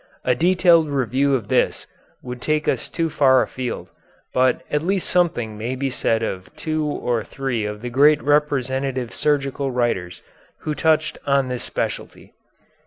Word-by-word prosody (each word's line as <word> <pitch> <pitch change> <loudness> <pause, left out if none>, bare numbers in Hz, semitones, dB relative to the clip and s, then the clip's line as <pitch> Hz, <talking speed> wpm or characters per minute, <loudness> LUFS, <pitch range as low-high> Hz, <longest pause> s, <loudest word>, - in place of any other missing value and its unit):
A 125 - +4
detailed 170 0 +4
review 135 +1 +1
of 115 -6 -3
this - - +1 0.4
would 125 -1 -7
take 155 +1 0
us - - -1
too 165 -1 -1
far 130 -4 +4
afield, 130 -2 -5 0.4
but 130 0 +2
at 150 - +1
least 190 +2 -1
something 120 -12 0
may 120 +4 -3
be 135 +1 -2
said 115 -2 0
of 95 -4 -4
two 155 -1 -2
or 125 -6 -1
three 120 0 -3
of 105 +1 -6
the 125 - -3
great 145 +4 +5
representative 135 -3 0
surgical 140 -2 0
writers 120 -8 -2 0.4
who 155 - -2
touched 155 0 +1
on 140 -2 +2
this 125 -1 -4
specialty. - - -5
135 Hz, 155 wpm, -22 LUFS, 125-150 Hz, 0.4 s, great